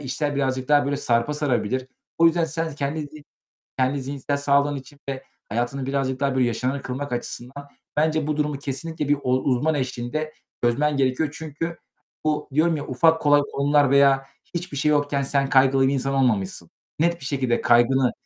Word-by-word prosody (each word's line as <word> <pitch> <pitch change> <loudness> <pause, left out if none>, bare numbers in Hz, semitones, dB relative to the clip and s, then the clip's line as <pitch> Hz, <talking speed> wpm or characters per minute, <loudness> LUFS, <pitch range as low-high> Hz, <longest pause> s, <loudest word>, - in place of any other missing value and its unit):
işler 145 +2 -2
birazcık 130 -2 -1
daha, 145 -1 +5
böyle, 140 0 -1
sarpa 120 +4 +1
sarabilir. 130 -3 -1 0.3
O 165 - +6
yüzden 165 0 +3
sen 165 0 -2
s 155 - -8
kendi 145 +2 -2
zi 150 0 -11 0.5
kendi 130 +2 +1
zihinsel 140 +1 -3
sağlığın 140 0 +2
için 135 +1 -11
ve 135 -1 -4 0.2
hayatını 120 +4 -2
birazcık 135 -1 -1
daha, 140 -1 +1
böyle, 130 -1 +3
yaşamını 130 +4 -2
kılmak 135 +2 -5
açısından 125 +3 -6 0.3
bence, 155 0 +1
bu 150 -1 -1
durumu 150 -2 -1
kesinlikle 150 +2 -4
bir 145 - +5
ol 130 +1 +1
uzman 140 +5 +1
eşliğinde 130 +3 -3 0.3
çözmen 145 +5 +2
gerekiyor. 135 +3 +1
Çünkü, 160 +2 -5 0.5
bu 150 -1 -1
diyorum 160 +2 +3
ya 145 - -5
ufak, 160 +5 +3
kolay 145 0 +5
konular 145 0 +3
veya 135 -1 +4 0.3
hiçbir 170 -3 -4
şey 150 +2 +2
yokken 145 -1 +1
sen 140 0 +1
kaygılı 135 -1 +4
bir 135 - +1
insan 135 +1 -1
olmamışsın. 100 -10 0 0.3
Net 170 +1 +1
bir - - -9
şekilde 130 -4 0
kaygını 120 +2 +4
140 Hz, 175 wpm, -23 LUFS, 130-150 Hz, 0.5 s, O